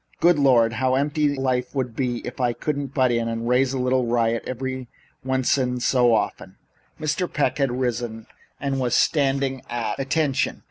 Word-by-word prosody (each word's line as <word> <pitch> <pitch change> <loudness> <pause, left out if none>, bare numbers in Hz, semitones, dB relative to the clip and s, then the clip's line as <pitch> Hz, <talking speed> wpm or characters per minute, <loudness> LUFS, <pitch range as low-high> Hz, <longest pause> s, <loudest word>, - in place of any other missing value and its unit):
Good 170 -2 +4
Lord, 120 -5 +4
how 130 0 +2
empty 145 +2 +1
life 130 -1 -1
would 125 -4 -2
be 125 -2 -2
if 125 +1 -6
I 120 -1 +2
couldn't 145 +1 -3
butt 130 -3 +3
in 115 -1 0
and 115 0 -3
raise 125 +1 +3
a 135 - -2
little 125 -1 +1
riot 115 -1 +1
every 130 0 -4 0.4
once 130 +1 +1
in 125 -1 -1
so 125 -1 +3
often." 110 - -3 0.4
Young 155 - -6
Mr. 175 +4 -1
Peck 150 0 0
had 135 -2 +2
risen 120 -3 -3 0.3
and 135 -1 -2
was 125 -2 +1
standing 135 -3 +1
at 120 -1 -3
attention. 135 0 0
130 Hz, 180 wpm, -23 LUFS, 120-135 Hz, 0.4 s, Good